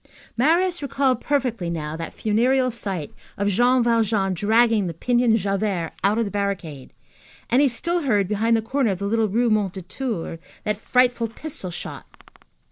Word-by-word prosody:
Marius 340 +7 +2
recalled 270 -3 0
perfectly 250 -11 -1
now 155 -2 -4
that 165 0 -6
funereal 250 +4 +2
sight 195 -9 -4 0.2
of 200 +1 +1
Jean 245 +5 +3
Valjean 220 -4 +1
dragging 220 +2 +3
the 165 - -5
pinioned 240 +4 +2
Javert 195 -4 -1
out 200 +3 +3
of 230 - +1
the 200 - -5
barricade, 190 -9 -4 0.6
and 250 +4 +5
he 290 - +5
still 340 +8 -1
heard 210 - +1
behind 225 +3 +2
the 220 - -2
corner 260 +1 0
of 190 - -1
the 200 - -4
little 220 +1 +1
Rue 235 +3 +1
Mondétour 195 -1 -2 0.2
that 210 -1 -1
frightful 245 +1 +2
pistol 225 -4 -5
shot. 175 - -7
220 Hz, 160 wpm, -23 LUFS, 195-250 Hz, 0.6 s, and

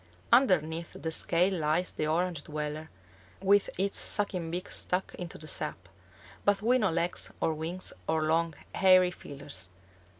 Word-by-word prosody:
Underneath 170 - +2
the 160 - -3
scale 175 +4 +2
lies 160 +4 +1
the 155 - -2
Orange 170 -1 -1
dweller, 150 +1 -4 0.5
with 200 +1 +3
its 195 +1 +1
sucking 185 -5 +2
beak 175 +2 -4
stuck 180 +1 -1
into 175 -2 -7
the 155 - -10
sap, - - -4 0.6
but 205 0 +2
with 250 +2 +3
no 200 - +3
legs 170 +1 -1
or 160 - +1
wings 165 +4 -4
or 160 -1 +1
long, 165 0 +1 0.2
hairy 185 -1 +5
feelers. 135 - -8
170 Hz, 145 wpm, -30 LUFS, 155-185 Hz, 0.6 s, hairy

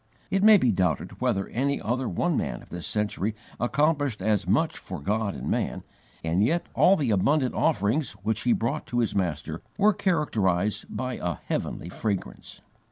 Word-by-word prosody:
It 195 - +2
may 215 +1 +8
be 125 - +3
doubted 90 -4 -1
whether 95 0 0
any 140 +4 0
other 125 +3 -1
one 85 - 0
man - - -2
of - - -18
this 85 -1 -4
century 105 0 -1 0.2
accomplished 145 0 +1
as 105 +1 +1
much - - +2
for - - -7
God 105 +5 -1
and - - -6
man, - - -1 0.4
and 85 +5 +2
yet 170 +10 +1
all 190 - +5
the 140 - 0
abundant 130 +7 +2
offerings 145 -1 +1
which 110 +1 0
he 125 - +2
brought 120 +7 -1
to 120 - -3
his 115 -2 +1
Master 80 -4 -2 0.2
were 210 +1 +5
characterized 105 - 0
by 130 -1 -3
a 85 -2 -1
heavenly 85 - -4
fragrance. 100 +1 -4
110 Hz, 170 wpm, -26 LUFS, 95-145 Hz, 0.4 s, may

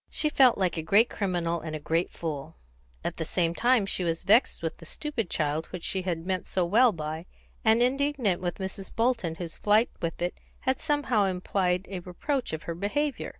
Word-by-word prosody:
She 305 - +1
felt 265 -4 +5
like 185 -3 0
a - - 0
great 205 +9 +4
criminal 175 -4 -1
and 155 -1 -5
a - - -4
great 165 +3 0
fool; 150 -5 -5 0.5
at - - -3
the 160 - -2
same 170 +1 0
time 240 +2 +3
she 190 - 0
was 165 -1 -1
vexed 210 0 +3
with 165 - -2
the 165 - -13
stupid 235 - -3
child 155 +1 -1
which 180 -2 -7
she 190 - -1
had 175 -3 -3
meant 185 -1 -2
so 185 -2 0
well 230 +7 +5
by, 160 0 -5 0.4
and 225 +2 +5
indignant 260 -7 +1
with 175 -1 -2
Mrs. 190 0 -5
Bolton, 230 -8 +1
whose 165 -1 -7
flight 215 +3 +3
with 165 -1 -3
it 175 +1 -1 0.3
had 260 0 0
somehow 290 -9 +1
implied 185 0 0
a 190 -2 -5
reproach 245 - -2
of 160 0 -4
her 170 - -3
behaviour. 270 - -1
185 Hz, 200 wpm, -28 LUFS, 170-230 Hz, 0.5 s, felt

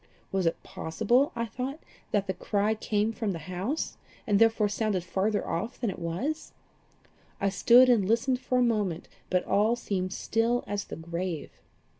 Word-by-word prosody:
Was 190 -3 +1
it 165 - -1
possible, 225 - +1
I 235 0 -1
thought, 260 +6 -5 0.3
that 200 -1 +1
the 190 - -1
cry 205 +3 0
came 215 0 0
from 215 -3 -2
the - - -4
house, 190 - -3 0.3
and 210 - -1
had 200 - +5
therefore 225 -2 +4
sounded 205 -3 -1
farther 195 +4 0
off 180 +8 -3
than 235 -5 0
it - - -9
was? 185 - -3 0.9
I 195 - +2
stood 240 +6 +6
and 225 -7 +4
listened 250 +3 +2
for 255 -1 0
a 250 - +4
moment, 210 -8 0 0.2
but 180 -1 +1
all 215 +4 +3
seemed 185 -5 -2
still 230 +4 0
as 205 0 -3
the - - -7
grave. 170 0 -4
210 Hz, 175 wpm, -28 LUFS, 185-235 Hz, 0.9 s, stood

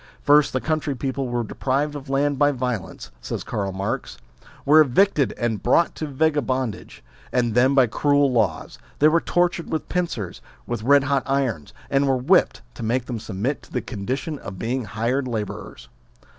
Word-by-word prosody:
First 145 0 +5
the 130 - 0
country 155 -1 -1
people 135 +1 -3
were 120 -1 -1
deprived 140 +6 -1
of 145 -2 -8
land 140 0 +1
by 145 0 +4
violence, 125 -7 -4
says - - -4
Karl 100 -2 -3
Marx, 95 +1 -4 0.5
were 155 +2 +7
evicted 150 +1 +3
and 115 -4 -1
brought 170 - +3
to 155 - -5
vagabondage; 130 - -1 0.3
and 120 -3 +1
then, 130 +4 +4
by 135 -2 +6
cruel 140 +4 +2
laws, 120 -2 -1 0.2
they 150 - +5
were 165 +1 +3
tortured 175 -1 0
with 160 - -3
pincers, 165 - -3 0.2
with 120 -2 -3
red 140 +4 +5
hot 140 -1 +1
irons, 130 - -1 0.2
and 140 0 +1
were 135 -1 +2
whipped, 165 +9 +2
to - - -10
make 120 +2 0
them 120 -3 -4
submit 110 +7 -3
to - - -19
the - - -1
condition 130 +7 -4
of 95 -1 -8
being 120 +4 -2
hired 120 +7 -1
labourers. 110 -4 -5
130 Hz, 170 wpm, -23 LUFS, 120-145 Hz, 0.5 s, were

